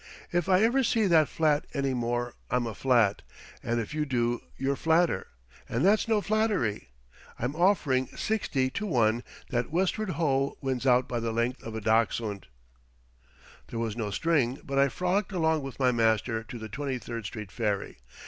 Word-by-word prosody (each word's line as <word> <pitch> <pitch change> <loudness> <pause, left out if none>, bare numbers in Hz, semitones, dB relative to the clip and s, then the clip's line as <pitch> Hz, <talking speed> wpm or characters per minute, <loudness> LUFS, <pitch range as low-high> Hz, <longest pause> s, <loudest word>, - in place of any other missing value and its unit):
If 175 +1 0
I 185 +2 +5
ever 255 +4 +3
see 225 -2 +2
that 160 -5 +4
flat 155 -2 +1
any 135 -2 0
more 120 0 -1 0.2
I'm 125 -1 +1
a 115 - -4
flat, 115 -4 +2 0.4
and 120 0 -1
if 115 +5 -4
you 155 0 0
do 120 -4 0 0.2
you're 135 +1 0
flatter; 160 - +2 0.4
and 120 +8 0
that's 210 +3 +4
no 220 -2 +2
flattery. 205 - 0 0.5
I'm 125 +5 -3
offering 155 -8 +2
60 140 -12 -1
to 210 - -3
1 120 - +2 0.3
that 120 -2 0
Westward 190 +5 0
Ho 140 -4 +1
wins 135 -1 -2
out 125 0 +4
by 120 - -2
the 115 0 -2
length 120 +3 -1
of 115 -1 -7
a 110 - -4
dachshund." 110 - 0 1.2
There 115 - -6
was 115 -2 -2
no 110 -3 -2
string, 135 +1 +1
but 135 -1 -1
I 140 0 +4
frolicked 185 +6 -1
along 160 -3 +2
with 135 -1 -8
my 130 -2 +4
master 115 -1 +1
to 120 - -8
the 110 -1 -7
Twenty 135 +4 -3
third 115 -1 -6
street 105 -1 -7
ferry. 105 - -2
130 Hz, 175 wpm, -28 LUFS, 115-160 Hz, 1.2 s, I